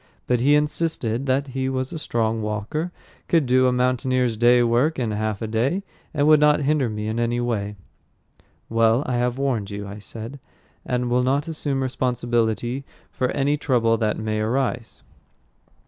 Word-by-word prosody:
But 125 -1 +1
he 140 +4 +4
insisted 150 -5 -1
that 135 +2 +1
he 130 0 -2
was 130 +3 -3
a 160 - -4
strong 115 -5 -1
walker, 110 - -3 0.4
could 165 -4 +3
do 130 +1 +4
a - - +3
mountaineer's 125 -1 +1
day's 120 +2 +5
work 125 +7 +2
in 120 -4 -1
half 105 0 -2
a - - -2
day, 125 - 0 0.3
and 145 -2 +1
would 155 0 +6
not 150 0 +4
hinder 145 -3 +1
me 105 0 -4
in 110 +2 -2
any 120 +1 0
way. 105 -4 -2 0.9
"Well, 115 +3 +3
I 125 -1 -1
have 125 +1 0
warned 125 -8 -1
you," 100 0 -6
I 100 +2 -8
said, 115 +6 -7 0.5
"and 125 -1 -1
will 125 +1 +3
not 140 +5 +1
assume 145 -4 -2
responsibility 120 -1 -1 0.3
for 125 - -1
any 145 +1 +1
trouble 120 -5 +2
that 110 -1 0
may 110 0 -2
arise." 120 +1 -2
125 Hz, 170 wpm, -23 LUFS, 115-135 Hz, 0.9 s, would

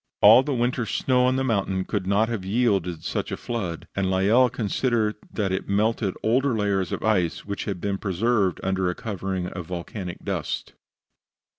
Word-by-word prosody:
All 110 +5 +9
the 145 - -3
winter's 120 -2 0
snow 125 +3 +2
on 130 - +2
the 135 - 0
mountain 95 -6 0
could 100 -4 -2
not 100 +3 +3
have 115 -4 -3
yielded 95 -6 0
such - - -3
a - - -2
flood, 95 -9 -4
and 95 -1 0
Lyell 105 +7 +4
considered 115 -1 0 0.2
that 100 -3 -1
it 95 - -3
melted 105 0 +1
older 125 +2 +2
layers 100 -4 0
of - - -3
ice 95 -7 +1
which 100 0 -4
had 100 -4 -3
been 100 +1 -2
preserved 100 -1 +1
under 95 -1 0
a 90 - -2
covering 95 -4 -3
of 90 -2 -6
volcanic 90 +1 -6
dust. - - -3
100 Hz, 175 wpm, -25 LUFS, 95-115 Hz, 0.2 s, All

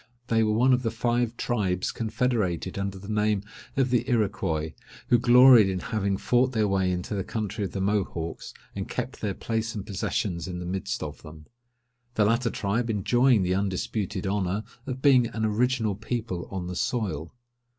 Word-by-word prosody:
They 115 0 +3
were 110 -1 +2
one 125 +4 +4
of 125 - +2
the 115 - 0
five 120 +1 0
tribes 95 -6 -1
confederated 110 -6 -1
under 100 0 -3
the 95 +1 -11
name 105 -1 +1 0.3
of 130 -2 +2
the 125 - +1
Iroquois, 80 -9 0 0.4
who 120 - +5
gloried 120 -3 +7
in 95 - -1
having 100 0 -1
fought 125 +4 +2
their 110 -2 +2
way 95 -2 +1
into 90 +3 -3
the 100 -2 -1
country 105 -1 -3
of 90 - -5
the 95 - -2
Mohawks, 95 -5 -2 0.2
and - - -4
kept - - -4
their 100 -3 -2
place 115 0 -2
and 100 - -5
possessions 90 -2 -2
in 90 -1 -5
the 90 - -5
midst 95 +1 -3
of - - -7
them; 75 0 -12 0.7
the 105 - +3
latter 115 +3 +2
tribe 115 +3 -1
enjoying 120 +2 +3
the 90 0 +1
undisputed 100 0 -2
honour 100 +1 -1 0.2
of 130 0 -5
being 130 -4 +6
an 110 -1 -2
original 110 0 +1
people 110 -3 -4
on 95 -2 -4
the 90 +1 -5
soil. 90 - -2
105 Hz, 180 wpm, -26 LUFS, 95-120 Hz, 0.7 s, gloried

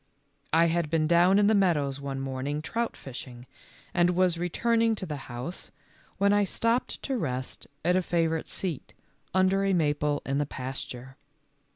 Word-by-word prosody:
I 165 +1 +5
had 170 -1 0
been 160 0 +2
down 175 +4 +5
in 205 - +5
the 215 - +4
meadows 150 -9 +2
one 135 -1 -4
morn 135 0 -4
ing 150 +1 -2
trout 230 +6 -2
fishing, 125 -2 -8 0.5
and 175 0 +3
was 180 -2 +2
returning 225 +6 +2
to 195 - -5
the 155 -4 -4
house, 125 +9 -5 0.5
when 200 0 +3
I 205 0 +4
stopped 230 +5 0
to 265 -3 -1
rest 130 -6 -4 0.2
at 180 +1 +4
a 185 - +3
favorite 165 -2 0
seat 175 -8 -3 0.4
under 190 +1 +3
a 195 -1 +2
maple 150 -3 +1
in 135 +1 0
the 145 - 0
pasture. 130 -1 -6
165 Hz, 170 wpm, -28 LUFS, 140-190 Hz, 0.5 s, I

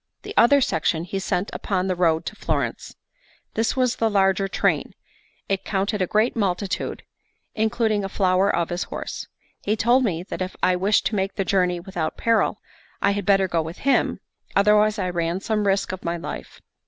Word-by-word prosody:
The - - -7
other 280 +4 +6
section 165 -5 0
he 195 +2 -4
sent 190 0 -2
upon 185 -2 -1
the 185 -1 0
road 165 -2 +2
to - - -5
Florence. - - -3 0.6
This 225 +1 0
was 255 -1 +1
the 225 - +2
larger 195 -1 +2
train; - - 0 0.5
it 195 -1 -1
counted 200 +1 -1
a 185 - +1
great 215 +5 +2
multitude, 195 -3 -2 0.5
including 220 -1 +1
the 195 - -4
flower 190 0 +2
of 170 -4 0
his 175 0 -2
horse. - - -6 0.3
He 210 - 0
told 240 +4 +3
me 175 -7 -1
that 185 - -6
if 185 +1 -3
I 185 - +4
wished 195 +4 +2
to 220 - 0
make 195 0 -1
the 195 - -1
journey 180 -2 +1
without 175 -3 -4
peril, 230 -1 +2 0.4
I 200 - +2
had 200 -1 -3
better 195 -1 +4
go 170 -2 0
with 160 +2 -7
him, 275 0 +1 0.4
otherwise 210 +1 +4
I 185 -3 -1
ran 170 0 -1
some 210 0 -1
risk 195 -1 +1
of 185 - -7
my 170 0 -2
life. 170 - -8
195 Hz, 190 wpm, -23 LUFS, 180-210 Hz, 0.6 s, other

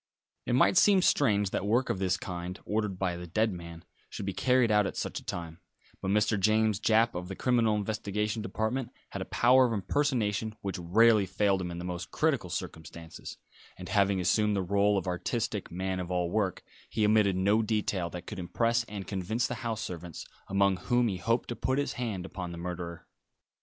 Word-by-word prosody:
It - - +1
might 130 +8 +4
seem 195 -2 +6
strange 105 - +3
that - - -1
work 120 +5 +2
of 95 - -3
this 95 -1 +1
kind, 90 0 -6
ordered 105 -3 -1
by 90 -2 -1
the 90 0 -7
dead 110 +4 +1
man, 85 -1 -9 0.2
should - - -6
be 100 - -2
carried 125 -1 +3
out 105 -1 +4
at - - -6
such - - -3
a - - -17
time; 85 -1 -6 0.4
but 95 - -2
Mr. 105 +1 +2
James 110 +1 +2
Japp, 115 +2 +3
of 90 0 -5
the 95 - -6
Criminal 115 -3 +2
Investigation 105 +1 -2
Department, 115 +3 -2 0.2
had - - -5
a - - -3
power 125 +2 +4
of 115 - -2
impersonation 110 -1 0
which 95 -1 -4
rarely 105 +4 +4
failed 95 0 +1
him 90 - -3
in 85 - -6
the 85 - -5
most 90 -1 -5
critical - - 0
circumstances; 80 +1 -7 0.4
and 90 - -8
having 100 -2 +2
assumed 105 +4 +2
the 95 - 0
role 100 +2 +2
of 95 - -2
artistic 105 +4 -2
man 95 +1 -3
of 90 -1 -4
all 90 -1 -1
work, 100 -3 -1 0.3
he 110 -1 +1
omitted 105 -2 +4
no 100 +4 +3
detail 105 -5 -1
that 90 +1 -8
could 105 - -7
impress 115 +6 +1
and 100 -3 -7
convince 100 +5 -1
the - - -2
house 115 -3 -2
servants, 85 -2 -7 0.2
among 100 -1 +2
whom 120 +5 +1
he 95 - -3
hoped 115 +7 0
to 120 - -4
put 130 +3 -1
his 145 - -1
hand 110 -7 -3
upon 90 -2 -6
the 85 - -7
murderer. 85 -1 -6
100 Hz, 200 wpm, -29 LUFS, 90-110 Hz, 0.4 s, seem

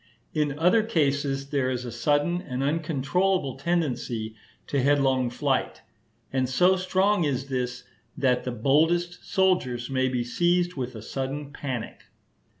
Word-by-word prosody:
In 150 -2 0
other 180 +8 +4
cases 140 -8 0
there 135 -3 +1
is 125 -1 -3
a 120 - -5
sudden 145 +8 +1
and 130 -7 -4
uncontrollable 155 +1 0
tendency 125 -8 -2 0.3
to 140 - 0
headlong 135 -2 +2
flight; 135 +2 -1 0.5
and 130 -1 +1
so 180 +8 +4
strong 190 +1 +2
is 140 -2 -1
this, 125 -2 -2 0.3
that 125 -2 +2
the 125 - -3
boldest 160 +9 +1
soldiers 135 -11 +1
may 130 -1 +1
be 125 -1 -1
seized 175 +7 +1
with 130 -4 -5
a 110 - -8
sudden 140 +3 -4
panic. 130 -6 -5
140 Hz, 140 wpm, -26 LUFS, 130-170 Hz, 0.5 s, other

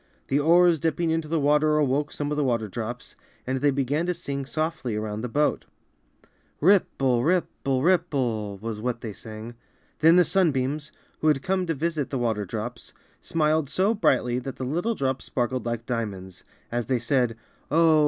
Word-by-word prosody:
The 140 - +2
oars 170 +2 +5
dipping 165 +2 0
into 160 -1 -1
the 160 +1 0
water 150 +1 +3
awoke 145 0 +1
some 145 0 -3
of - - 0
the 150 - +2
water 115 -4 0
drops, 120 +5 -6 0.3
and 130 0 -2
they 145 - +4
began 140 +4 0
to 180 - 0
sing 140 -3 -4
soMy 155 -7 -2
around 105 0 -4
the 125 - -4
boat. 150 +5 +1 0.9
"Ripple, 135 -9 +3
ripple, 140 -5 0
ripple^' 120 - 0
was 110 0 -5
what 120 0 -2
they 110 -3 -5
sang. 110 +3 -9 0.5
Then 165 +2 +6
the 180 -1 +6
Sunbeams, 150 -4 +1 0.3
who 155 - 0
had 145 -3 +3
come 185 -1 0
to 165 - 0
visit 155 -1 -2
the 135 - -2
water 110 -4 -1
drops, 115 +5 -6 0.3
smiled 155 -2 +1
so 190 +9 +2
brightly 125 - +2
that 130 +1 -7
all 130 - -2
the 130 - -3
little 220 +8 0
drops 135 -4 -2
sparkled 125 0 -2
like 115 0 -3
diamonds, 95 -6 -4 0.3
as 120 -2 -2
they 130 - +2
said, 120 -1 0 0.3
"Oh! 160 +1 +5
135 Hz, 180 wpm, -25 LUFS, 120-160 Hz, 0.9 s, Then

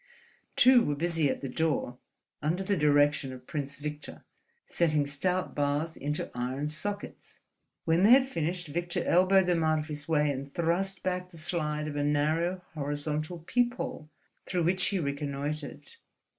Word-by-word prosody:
Two 250 -1 +7
were 145 - 0
busy 165 -1 +1
at - - -2
the 135 - -3
door, 135 -3 -1 0.4
under 165 +6 0
the 200 +1 +1
direction 145 -3 +3
of 125 -1 -10
Prince 140 -1 -4
Victor, 150 0 -7 0.4
setting 155 -4 +1
stout 180 +6 -1
bars 145 +3 -1
into 150 +2 -3
iron 130 +4 -2
sockets. 200 +7 -6 0.5
When 165 +2 +3
they 205 - +6
had 260 +2 +7
finished, 175 - -2
Victor 170 +3 -2
elbowed 185 +2 +5
them 175 -2 +2
out 155 0 +3
of 155 +1 -4
his 150 -1 -5
way 150 -2 +3
and 140 0 -5
thrust 175 +4 -1
back 180 0 -2
the 170 - -13
slide 150 -2 -1
of 150 - -5
a 145 - 0
narrow 160 +5 +1
horizontal 150 +2 -2
peephole, 240 -10 -1 0.4
through 180 -2 0
which 180 +2 +2
he 200 - 0
reconnoitred. 145 -1 -4
155 Hz, 155 wpm, -29 LUFS, 145-180 Hz, 0.5 s, Two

